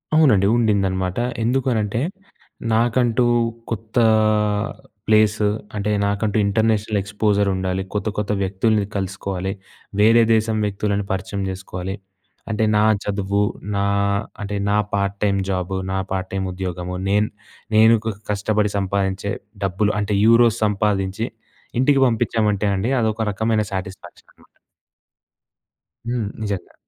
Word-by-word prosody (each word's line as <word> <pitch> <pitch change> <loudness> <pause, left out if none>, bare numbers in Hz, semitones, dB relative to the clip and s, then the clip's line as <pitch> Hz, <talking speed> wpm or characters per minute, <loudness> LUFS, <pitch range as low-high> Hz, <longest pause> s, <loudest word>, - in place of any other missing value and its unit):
అవునండి. 115 -12 +5
ఉండిందనమాట. 95 -4 +1 0.3
ఎందుకనంటే 120 -3 0 0.7
నాకంటూ 120 +1 +2 0.5
కొత్త 110 +1 -5 1.1
ప్లేసు 110 0 +3 0.3
అంటే 105 0 -1 0.2
నాకంటూ 105 +1 0
ఇంటర్నేషనల్ 110 0 +1
ఎక్స్పోజర్ 100 0 +1
ఉండాలి. 95 0 -1
కొత్త 105 +1 -2
కొత్త 105 0 -1
వ్యక్తుల్ని 100 +2 +1
కలుసుకోవాలి. 95 0 -3 0.5
వేరే 115 +2 +6
దేశం 110 0 +1
వ్యక్తులని 100 0 -1
పరిచయం 95 +1 -3
చేసుకోవాలి. 95 0 -5 0.6
అంటే 110 +1 0
నా 105 - +4 0.2
చదువు 100 0 -1 0.3
నా 100 - +1 0.6
అంటే 105 0 -4
నా 105 - +3 0.2
పార్ట్ 100 0 0
టైం 100 -1 +2
జాబు, 95 0 -2 0.2
నా 95 - -1
పార్ట్ 95 -1 -2
టైమ్ 95 0 -2
ఉద్యోగము 90 -1 -4
నేను 105 +1 +3 0.5
నేను 110 +1 +7 0.3
కష్టపడి 105 0 0
సంపాదించే 95 0 -1 0.3
డబ్బులు 100 +3 +1
అంటే 105 0 0
యూరోస్ 115 0 +5
సంపాదించి 105 +1 0 0.5
ఇంటికి 135 +1 +4
పంపించామంటే 110 -3 +1
అండి 95 +6 -1
అదొక 110 0 0
రకమైన 110 +2 0
సా‌టిస్ఫ్యాక్షన్ 95 -1 -7
అనమాట. - - -26 1.6
హ్మ్. 115 -5 -1
నిజంగా. 100 -4 -4
105 Hz, 110 wpm, -21 LUFS, 95-110 Hz, 1.6 s, నేను